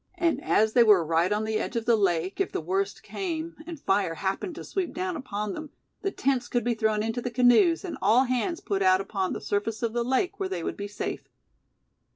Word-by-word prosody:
And 345 -2 0
as 220 +1 +2
they 245 - +6
were 205 -7 +5
right 165 +4 +2
on 210 +1 +1
the 215 0 -1
edge 240 - -4
of 230 -1 -1
the 235 -1 +5
lake, 185 - 0
if 390 - -1
the - - -2
worst 195 +4 -2
came, 335 -3 -4
and 335 -3 -7
fire 195 -8 +1
happened 195 - -3
to - - -7
sweep 380 -3 -3
down 365 0 -2
upon 210 -8 -4
them, 310 -1 -7 0.3
the 390 - 0
tents 260 -8 0
could 240 -2 0
be 240 +1 +1
thrown 220 -1 +1
into 225 +2 -2
the 245 - -3
canoes, 250 - +4
and 355 - -6
all 225 +6 +5
hands 260 +7 -1
put 200 -3 -2
out 185 -1 +5
upon 195 -1 -2
the - - -4
surface 210 +3 -2
of 230 -1 0
the 240 0 0
lake 265 +9 0
where 190 - -2
they 180 -3 -3
would - - -3
be 205 - -5
safe. 205 - -5
225 Hz, 230 wpm, -27 LUFS, 195-270 Hz, 0.3 s, they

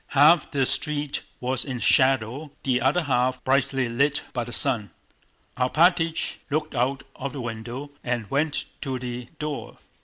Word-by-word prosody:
Half 155 +4 +6
the 135 -2 +1
street 150 +1 0 0.2
was 130 0 0
in 130 -3 -4
shadow, 130 +4 +3
the 130 -2 +1
other 145 +8 +2
half 130 -2 +1
brightly 135 -1 +2
lit 140 +5 +1
by 120 - -1
the 120 - -8
sun. 120 -7 +1 0.7
Alpátych 165 +5 +2
looked 155 +1 -1
out 135 +2 0
of 135 -1 -5
the 135 - -5
window 120 +5 -6
and 120 -3 -2
went 145 +2 0 0.2
to 135 -3 -2
the 125 -1 -5
door. 150 -2 -5
135 Hz, 150 wpm, -25 LUFS, 125-145 Hz, 0.7 s, Half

